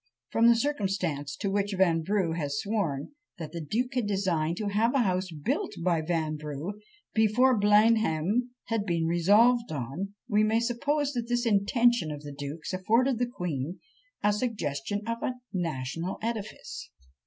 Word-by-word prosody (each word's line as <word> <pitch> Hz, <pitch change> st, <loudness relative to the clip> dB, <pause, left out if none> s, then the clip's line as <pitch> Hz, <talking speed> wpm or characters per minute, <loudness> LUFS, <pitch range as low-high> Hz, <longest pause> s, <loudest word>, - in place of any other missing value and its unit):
From 230 Hz, +1 st, +4 dB
the 235 Hz, -, +7 dB
circumstance 190 Hz, -, -1 dB
to 200 Hz, -2 st, -2 dB
which 200 Hz, 0 st, 0 dB
Vanbrugh 175 Hz, 0 st, +2 dB
has 145 Hz, -4 st, -2 dB
sworn, 195 Hz, -, -2 dB, 0.3 s
that 160 Hz, -3 st, -6 dB
the 170 Hz, 0 st, -5 dB
duke 240 Hz, -, -1 dB
had 250 Hz, -4 st, 0 dB
designed 175 Hz, -5 st, 0 dB
to 210 Hz, -2 st, -2 dB
have 225 Hz, +5 st, +2 dB
a 265 Hz, -, +4 dB
house 185 Hz, -2 st, 0 dB
built 150 Hz, -4 st, -2 dB
by 170 Hz, -3 st, +2 dB
Vanbrugh, 155 Hz, 0 st, -3 dB, 0.4 s
before 225 Hz, +4 st, +4 dB
Blenheim 210 Hz, 0 st, +3 dB
had 225 Hz, -3 st, -2 dB
been 170 Hz, -2 st, +1 dB
resolved 210 Hz, +7 st, +4 dB
on, 155 Hz, +9 st, -4 dB
we 210 Hz, 0 st, +3 dB
may 220 Hz, +1 st, +3 dB
suppose 285 Hz, +5 st, 0 dB
that 240 Hz, -2 st, -3 dB
this 240 Hz, 0 st, +1 dB
intention 230 Hz, -1 st, +3 dB
of 150 Hz, 0 st, -7 dB
the 145 Hz, -1 st, -7 dB
duke's 145 Hz, +5 st, -6 dB
afforded 230 Hz, +7 st, +2 dB
the 245 Hz, -, +1 dB
queen 175 Hz, -, -4 dB, 0.4 s
a 210 Hz, 0 st, +4 dB
suggestion 205 Hz, -, -2 dB
of 230 Hz, 0 st, -3 dB
a 255 Hz, -, -1 dB, 0.2 s
national 165 Hz, 0 st, -3 dB
edifice. 220 Hz, -2 st, -5 dB
200 Hz, 155 wpm, -28 LUFS, 160-230 Hz, 0.4 s, the